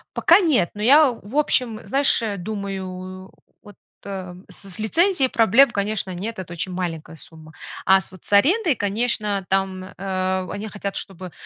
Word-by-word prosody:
Пока 340 +3 +5
нет, 285 - +2
но 210 - -7
я, 280 +3 +6
в 225 +2 -11
общем, 250 -6 +1
знаешь, 275 -1 +3 0.2
думаю, 185 -1 -6 0.3
вот, 205 -1 -14 0.3
эм, 185 -2 -8
с 195 - -3
с 180 - -1
лицензией 325 - +2
проблем, 235 +2 +4
конечно, 200 -2 -2
нет, 215 +6 -5
это 175 -2 -7
очень 180 +2 -5
маленькая 170 -3 -5
сумма. 160 0 -14 0.3
А 190 0 +6
с 190 - 0
вот 185 - -15
с - - -8
арендой, 320 - +3
конечно, 205 -1 -1
там, 190 -1 -1
э, 185 -1 -3
они 205 +2 -5
хотят, 200 -1 -6
чтобы 185 -2 -6
200 Hz, 160 wpm, -22 LUFS, 185-230 Hz, 0.3 s, я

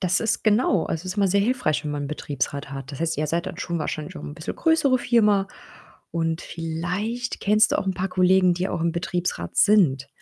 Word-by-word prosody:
das 185 0 +1
ist 225 -1 0
genau, 210 -4 +3
also, 165 +3 -4
ist 185 - -4
immer 200 -2 +3
sehr 200 +2 +3
hilfreich, 215 - 0
wenn 150 - -2
man 145 -1 -3
'n - - -4
Betriebsrat 140 -2 -4
hat. 135 +1 -7
Das 140 - -8
heißt, 165 -2 0
ihr 155 +1 -1
seid 170 +4 -1
dann - - -6
schon 170 -1 -3
wahrscheinlich 150 0 -4
auch - - -8
'n 145 - -7
bisschen 165 +1 -6
größere 290 -6 +3
Firma 210 -5 +3 0.6
und 165 0 -1
vielleicht 180 +9 -4
kennst 215 +3 +3
du - - +2
auch - - -2
'n 190 - 0
paar 190 +2 -2
Kollegen, 185 0 +4
die 180 +2 -2
auch 170 - -3
im 170 0 +1
Betriebsrat 175 +1 -3
sind. 155 -11 +4
180 Hz, 225 wpm, -24 LUFS, 160-205 Hz, 0.6 s, Kollegen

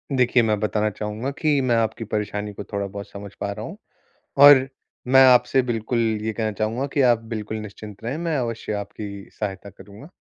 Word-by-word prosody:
देखिए, 125 -1 +3
मैं 110 -2 +1
बताना 105 0 0
चाहूँगा 105 +4 -4
कि 150 -3 +2
मैं 125 -2 +1
आपकी 115 0 -1
परेशानी 105 -1 -3
को 105 - -7
थोड़ा-बहुत 100 0 -5
समझ 100 0 -10
पा 100 - -2
रहा 105 +2 -6
हूँ। - - -9 0.6
और 140 -2 +8 0.4
मैं 135 +1 +7
आपसे 125 +1 +5
बिल्कुल 120 -1 -2 0.2
ये 110 +1 -2
कहना 110 0 -2
चाहूँगा 110 +5 -2
कि 140 0 0
आप 120 -3 +4
बिल्कुल 110 -1 -4
निश्चिंत 105 0 -10
रहें 125 +6 -3
मैं 165 -1 -2
अवश्य 115 -4 -3
आपकी 100 -1 -7
सहायता 100 -1 -4
करूँगा। 100 - -14
110 Hz, 180 wpm, -23 LUFS, 105-125 Hz, 0.6 s, और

